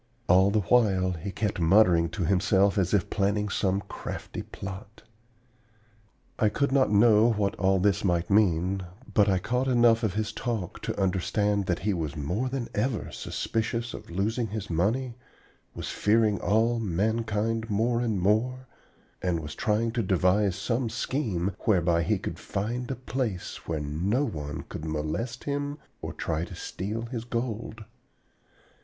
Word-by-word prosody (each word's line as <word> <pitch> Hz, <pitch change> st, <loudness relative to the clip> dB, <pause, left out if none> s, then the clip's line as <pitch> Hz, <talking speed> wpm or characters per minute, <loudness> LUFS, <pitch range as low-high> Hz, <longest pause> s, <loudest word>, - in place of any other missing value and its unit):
All 95 Hz, +2 st, +6 dB
the 105 Hz, +1 st, +2 dB
while 95 Hz, -4 st, +3 dB
he 90 Hz, +3 st, -5 dB
kept 105 Hz, -2 st, -2 dB
muttering 85 Hz, -1 st, +5 dB
to 85 Hz, +1 st, -2 dB
himself 100 Hz, +2 st, +3 dB
as 90 Hz, -2 st, +1 dB
if 100 Hz, -5 st, +1 dB
planning 105 Hz, 0 st, +1 dB
some 95 Hz, 0 st, 0 dB
crafty -, -, -6 dB
plot. 95 Hz, +2 st, -9 dB, 1.4 s
I 110 Hz, -, +4 dB
could 140 Hz, +6 st, 0 dB
not 135 Hz, -1 st, +3 dB
know 110 Hz, +2 st, +5 dB
what 105 Hz, -2 st, 0 dB
all 95 Hz, -1 st, +3 dB
this 100 Hz, +1 st, +2 dB
might 85 Hz, -3 st, +1 dB
mean, 95 Hz, -2 st, +3 dB, 0.3 s
but 105 Hz, 0 st, +4 dB
I 95 Hz, -, +3 dB
caught 125 Hz, +8 st, -1 dB
enough 120 Hz, -2 st, +4 dB
of 105 Hz, -5 st, -1 dB
his 110 Hz, +1 st, -1 dB
talk 110 Hz, -6 st, -4 dB
to -, -, -3 dB
understand 100 Hz, +1 st, +1 dB
that 90 Hz, -, +1 dB
he 105 Hz, -, +2 dB
was 80 Hz, -4 st, -3 dB
more 90 Hz, -, -2 dB
than 130 Hz, -2 st, -3 dB
ever 110 Hz, +2 st, -1 dB
suspicious 115 Hz, +1 st, -2 dB
of -, -, -9 dB
losing 110 Hz, +7 st, -1 dB
his 105 Hz, -2 st, -5 dB
money, 115 Hz, +9 st, 0 dB, 0.6 s
was -, -, -5 dB
fearing 105 Hz, -1 st, +2 dB
all 115 Hz, +3 st, +2 dB
man 110 Hz, +3 st, 0 dB
kind 110 Hz, +1 st, -1 dB
more 115 Hz, +3 st, +1 dB
and 110 Hz, -5 st, 0 dB
more, 115 Hz, +7 st, +1 dB, 0.6 s
and 90 Hz, -2 st, 0 dB
was 75 Hz, -1 st, -6 dB
trying 110 Hz, +2 st, 0 dB
to 120 Hz, 0 st, 0 dB
devise 95 Hz, 0 st, +2 dB
some 115 Hz, +4 st, -1 dB
scheme 110 Hz, -, -1 dB
whereby 85 Hz, -5 st, +3 dB
he 85 Hz, -, +1 dB
could -, -, -6 dB
find 120 Hz, +5 st, -3 dB
a 135 Hz, -, -2 dB
place 125 Hz, -7 st, -4 dB
where 80 Hz, -2 st, -1 dB
no 90 Hz, -, 0 dB
one 75 Hz, -, -5 dB
could -, -, -7 dB
molest 80 Hz, +11 st, -3 dB
him 145 Hz, 0 st, -2 dB, 0.2 s
or -, -, -4 dB
try 80 Hz, 0 st, -2 dB
to 85 Hz, -, -7 dB
steal 105 Hz, +5 st, -4 dB
his 115 Hz, -1 st, -5 dB
gold. 115 Hz, -2 st, -4 dB
105 Hz, 160 wpm, -27 LUFS, 95-115 Hz, 1.4 s, All